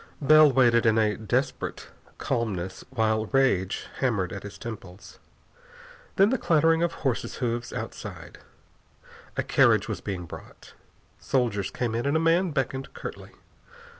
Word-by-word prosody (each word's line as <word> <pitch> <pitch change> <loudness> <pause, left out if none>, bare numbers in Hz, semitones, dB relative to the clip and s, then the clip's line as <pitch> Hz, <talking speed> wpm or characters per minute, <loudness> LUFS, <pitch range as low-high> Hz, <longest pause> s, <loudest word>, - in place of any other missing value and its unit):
Bell 155 0 +6
waited 120 -3 +4
in 110 0 +4
a 105 -1 +2
terrible 110 -2 -2 0.4
calmness, 100 -8 -3
while 110 -3 0
rage 130 -9 +1
hammered 110 -9 0
at 100 - -6
his 100 0 -9
temples. 100 -5 -10 1.0
Then 195 +3 +4
the 260 - 0
clattering 165 0 +3
of 170 0 +1
horses' 130 -3 -1
hoofs 120 -1 -3
outside. - - -7 1.0
A - - +1
carriage - - +3
was - - -4
being 90 -3 -5
brought. - - -12 0.5
Soldiers 110 -7 0
came 120 -3 -3
in 120 +4 -1
and 145 +3 +2
a - - +1
man 170 +3 +3
beckoned 135 -2 -3
curtly. - - -8
120 Hz, 135 wpm, -26 LUFS, 105-140 Hz, 1.0 s, Bell